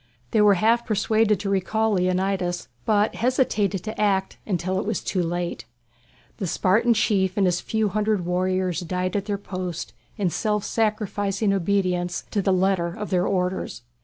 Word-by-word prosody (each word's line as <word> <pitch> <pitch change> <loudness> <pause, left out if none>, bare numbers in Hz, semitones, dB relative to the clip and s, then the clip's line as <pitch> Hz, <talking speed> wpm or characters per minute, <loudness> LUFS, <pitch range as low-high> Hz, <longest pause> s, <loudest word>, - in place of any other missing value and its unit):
They 215 - +3
were 205 -1 +6
half 230 +5 +3
persuaded 215 -1 +2
to 200 - -2
recall 220 +3 +1
Leonidas, 185 -1 0 0.2
but 210 0 +2
hesitated 220 -6 +1
to 215 0 -4
act 195 -2 +1
until 185 -1 -1
it - - -3
was 220 - -2
too 185 - -1
late. 175 -8 -3 0.7
The 195 - -3
Spartan 215 +8 +2
chief 200 -3 +1
and 200 - +3
his 180 -1 +1
few 220 -1 0
hundred 210 -2 0
warriors 185 0 0
died 180 +1 -2
at 200 -1 -1
their 205 -1 -1
post 185 -3 -5 0.2
in 195 -5 0
self 210 +1 0
sacrificing 210 -2 0
obedience 180 -2 0
to 205 - +1
the 195 - +1
letter 185 -1 +2
of 205 +5 -6
their 180 -1 +2
orders. 180 - -2
195 Hz, 160 wpm, -24 LUFS, 180-210 Hz, 0.7 s, were